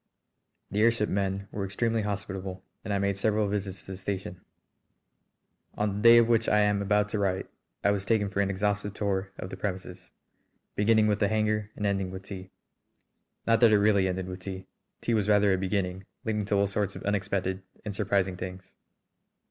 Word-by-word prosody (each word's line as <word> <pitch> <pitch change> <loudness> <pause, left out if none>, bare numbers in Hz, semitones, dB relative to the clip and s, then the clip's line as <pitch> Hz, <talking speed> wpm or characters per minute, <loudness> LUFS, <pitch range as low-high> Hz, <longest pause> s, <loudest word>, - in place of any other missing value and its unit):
The 105 +2 +1
airship 115 -1 +3
men 100 0 -1
were 100 - -3
extremely 110 +4 0
hospitable, 95 -2 -4 0.2
and 105 - -4
I 100 - +2
made 100 0 +1
several 105 0 +1
visits 100 -1 -3
to - - -8
the 95 - -6
station. 95 -2 -4 1.3
On 105 -1 -1
the - - -3
day 115 +1 +9
of 115 -1 +6
which 115 -1 +3
I 105 - +4
am 105 -1 +2
about 105 +1 +2
to 105 - -2
write 95 -1 0 0.4
I 100 - +4
was 100 -2 -1
taken 105 -1 +2
for 100 0 0
an 100 - +1
exhaustive 105 +1 -1
tour 95 -1 -1
of 90 - -6
the - - -6
premises, 95 -2 -5 0.6
beginning 110 +1 +4
with 105 -1 +2
the 105 - +3
hangar 105 0 0
and 105 - -3
ending 95 -2 0
with 95 +1 -7
tea. 95 -2 -8 1.0
Not 115 -1 +4
that 115 -2 +6
it 105 - +6
really 100 -2 +4
ended 95 0 -2
with 90 0 -6
tea. 95 0 -7 0.4
Tea 120 - 0
was 105 -2 +1
rather 105 -1 +5
a - - +2
beginning, 95 -1 -2 0.2
leading 105 -2 -1
to 100 - 0
all 100 0 +3
sorts 100 -1 -2
of - - -8
unexpected 100 -2 -1 0.2
and 105 - -3
surprising 100 -3 0
things. 95 +1 -7
100 Hz, 195 wpm, -28 LUFS, 95-105 Hz, 1.3 s, day